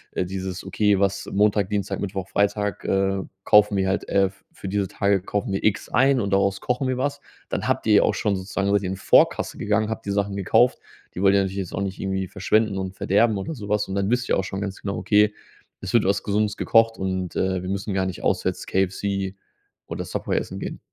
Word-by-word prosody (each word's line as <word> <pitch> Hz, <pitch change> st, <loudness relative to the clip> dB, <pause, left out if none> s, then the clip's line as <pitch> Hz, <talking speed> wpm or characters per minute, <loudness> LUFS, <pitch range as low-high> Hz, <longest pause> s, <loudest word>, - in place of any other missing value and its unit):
dieses: 95 Hz, 0 st, -3 dB
“Okay, 105 Hz, -2 st, +2 dB
was 100 Hz, 0 st, 0 dB
Montag, 105 Hz, -1 st, +3 dB
Dienstag, 105 Hz, -2 st, -2 dB
Mittwoch, 95 Hz, -1 st, -4 dB
Freitag 100 Hz, 0 st, 0 dB
äh, 95 Hz, 0 st, +1 dB, 0.2 s
kaufen 105 Hz, 0 st, +5 dB
wir 95 Hz, -1 st, +1 dB
halt, 95 Hz, -, -1 dB
äh 100 Hz, -1 st, +2 dB, 0.2 s
für 95 Hz, -, -7 dB
diese 100 Hz, 0 st, 0 dB
Tage 100 Hz, 0 st, +1 dB
kaufen 100 Hz, +1 st, -3 dB
wir 95 Hz, -, -1 dB
X 105 Hz, 0 st, +1 dB
ein 135 Hz, +1 st, +3 dB
und 100 Hz, -1 st, -2 dB
daraus 100 Hz, 0 st, +1 dB
kochen 125 Hz, +1 st, -1 dB
wir 130 Hz, -, -1 dB
was“. 140 Hz, +2 st, -1 dB, 0.3 s
Dann -, -, -2 dB
habt -, -, 0 dB
ihr -, -, +5 dB
auch -, -, +1 dB
schon 100 Hz, -2 st, 0 dB
sozusagen 100 Hz, +1 st, -2 dB
seit 100 Hz, -1 st, +3 dB
ihr 95 Hz, -, -3 dB
in 95 Hz, -, -2 dB
Vorkasse 95 Hz, -, +3 dB
gegangen, 105 Hz, +1 st, 0 dB
habt 110 Hz, -, -5 dB
die 100 Hz, -, -2 dB
Sachen 100 Hz, 0 st, -1 dB
gekauft, 120 Hz, +6 st, +3 dB, 0.4 s
die 90 Hz, -, -4 dB
wollt 100 Hz, 0 st, +5 dB
ihr 100 Hz, -, +4 dB
natürlich 95 Hz, 0 st, -3 dB
jetzt 95 Hz, -3 st, -4 dB
auch -, -, -2 dB
nicht 95 Hz, -1 st, -4 dB
irgendwie 95 Hz, -1 st, -2 dB
verschwenden 105 Hz, +1 st, +1 dB
und 95 Hz, 0 st, -4 dB
verderben 105 Hz, +4 st, +2 dB
oder 95 Hz, +11 st, -4 dB
so 105 Hz, -6 st, -8 dB
was. 105 Hz, -1 st, 0 dB
Und 95 Hz, -, -3 dB
dann 100 Hz, 0 st, 0 dB
wisst 125 Hz, +1 st, 0 dB
ihr -, -, +3 dB
auch -, -, 0 dB
schon 95 Hz, +1 st, -5 dB
ganz 100 Hz, -1 st, -5 dB
genau: 100 Hz, -1 st, -3 dB
„Okay, 105 Hz, 0 st, +3 dB, 0.5 s
es 95 Hz, -, -5 dB
wird 115 Hz, -4 st, +4 dB
was 100 Hz, +1 st, +1 dB
Gesundes 105 Hz, 0 st, 0 dB
gekocht 115 Hz, 0 st, +3 dB
und, 95 Hz, -1 st, -3 dB
äh, 95 Hz, -1 st, 0 dB
wir 90 Hz, -, -5 dB
müssen 100 Hz, +1 st, -3 dB
gar 95 Hz, -1 st, 0 dB
nicht 95 Hz, -2 st, -5 dB
auswärts, -, -, -1 dB
KFC 95 Hz, 0 st, -1 dB, 0.5 s
oder -, -, -5 dB
Subway, -, -, -2 dB
essen -, -, -4 dB
gehen“. -, -, -6 dB
100 Hz, 225 wpm, -23 LUFS, 95-105 Hz, 0.5 s, kaufen